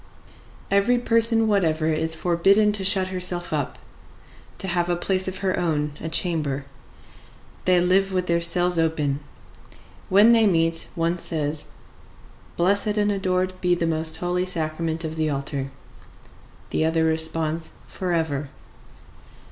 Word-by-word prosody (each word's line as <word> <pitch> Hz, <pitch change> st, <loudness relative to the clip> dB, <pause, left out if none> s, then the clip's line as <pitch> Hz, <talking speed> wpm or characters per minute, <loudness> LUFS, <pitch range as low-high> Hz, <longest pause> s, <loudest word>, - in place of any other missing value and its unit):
Every 200 Hz, +5 st, +3 dB
person 230 Hz, -1 st, +4 dB
whatever 160 Hz, -6 st, +1 dB
is 160 Hz, +1 st, -1 dB
forbidden 195 Hz, +6 st, +2 dB
to 205 Hz, -2 st, -3 dB
shut 190 Hz, -1 st, +2 dB
herself 180 Hz, -2 st, 0 dB
up, 145 Hz, -3 st, -3 dB, 0.8 s
to 190 Hz, -, -2 dB
have 175 Hz, -1 st, -1 dB
a 175 Hz, -, +1 dB
place 185 Hz, +2 st, 0 dB
of 190 Hz, +1 st, -5 dB
her 185 Hz, -1 st, 0 dB
own, 150 Hz, -4 st, -1 dB
a 160 Hz, -, -4 dB
chamber. 150 Hz, -6 st, -1 dB, 1.0 s
They 185 Hz, -1 st, +4 dB
live 190 Hz, +2 st, +2 dB
with 185 Hz, -1 st, -1 dB
their 170 Hz, -1 st, 0 dB
cells 175 Hz, 0 st, +3 dB
open. 150 Hz, -4 st, 0 dB, 0.9 s
When 205 Hz, +5 st, +6 dB
they 225 Hz, -2 st, +4 dB
meet, 165 Hz, -2 st, +1 dB
one 170 Hz, +1 st, -1 dB
says, 150 Hz, -3 st, -2 dB, 0.8 s
"Blessed 200 Hz, +4 st, +1 dB
and 205 Hz, 0 st, +1 dB
adored 185 Hz, -1 st, -1 dB
be 180 Hz, -1 st, +2 dB
the 170 Hz, -, -2 dB
most 160 Hz, 0 st, +2 dB
Holy 180 Hz, +1 st, -2 dB
Sacrament 160 Hz, -1 st, -2 dB
of 160 Hz, 0 st, -5 dB
the 155 Hz, -1 st, 0 dB
altar!" 140 Hz, -1 st, -4 dB, 1.0 s
The -, -, 0 dB
other 160 Hz, 0 st, +1 dB
responds, 160 Hz, 0 st, 0 dB
"Forever." 160 Hz, -6 st, -3 dB
175 Hz, 135 wpm, -23 LUFS, 160-190 Hz, 1.0 s, When